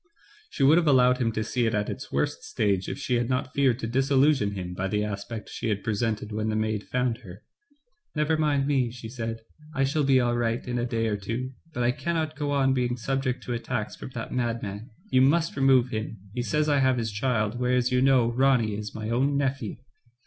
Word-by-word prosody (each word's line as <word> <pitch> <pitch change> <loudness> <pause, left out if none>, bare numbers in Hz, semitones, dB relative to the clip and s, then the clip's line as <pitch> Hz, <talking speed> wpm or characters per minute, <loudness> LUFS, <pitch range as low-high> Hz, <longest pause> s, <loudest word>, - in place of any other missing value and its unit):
She 140 - -2
would 150 +5 +7
have 165 - -1
allowed 125 -2 +5
him 115 -3 +1
to 110 - -1
see 120 +2 0
it 110 - 0
at 105 0 0
its - - -6
worst - - -1
stage 100 -3 0
if - - -4
she 125 -3 0
had 120 0 -1
not 130 0 -1
feared 135 -4 +3
to 115 - -2
disillu 135 +3 +3
sionize 105 -9 0
him 90 -2 -5
by 90 +2 -2
the 105 +2 0
aspect 105 +2 -5
she 115 - -4
had 100 -2 -1
presented 110 -1 -1
when 110 +1 -1
the 110 - -1
maid 110 -1 -1
found 125 -2 0
her. 95 -3 -12 0.7
"Never 150 +1 +2
mind 150 -3 +1
me," 135 -4 +1
she 115 -1 -9
said, 115 -1 -5 0.3
"I 135 - +2
shall 145 +3 +1
be 135 -1 +4
all 120 -1 +1
right 120 0 -1
in 125 0 -1
a 120 - -1
day 115 -1 -1
or 105 -2 0
two; 115 +6 -4 0.2
but 125 -6 -2
I 120 - +3
cannot 160 +2 -2
go 145 -1 -2
on 135 -2 +2
being 125 -1 0
subject 130 +1 -2
to 120 - -3
attacks 115 -2 -3
from - - -8
that 115 - -5
madman, 115 -3 -3 0.2
you 130 - +5
must 160 +5 +3
remove 135 -2 +4
him; 110 -1 -4 0.2
he 125 - -2
says 150 +5 0
I 145 -2 +3
have 130 -1 +3
his 115 -2 -2
child, 110 0 0
whereas 125 0 +1
you 125 0 +3
know 130 -3 +4
Ronny 125 -3 +3
is 105 -1 -6
my 110 +1 -4
own 135 +4 +2
nephew. 135 -5 -1
125 Hz, 230 wpm, -26 LUFS, 110-135 Hz, 0.7 s, would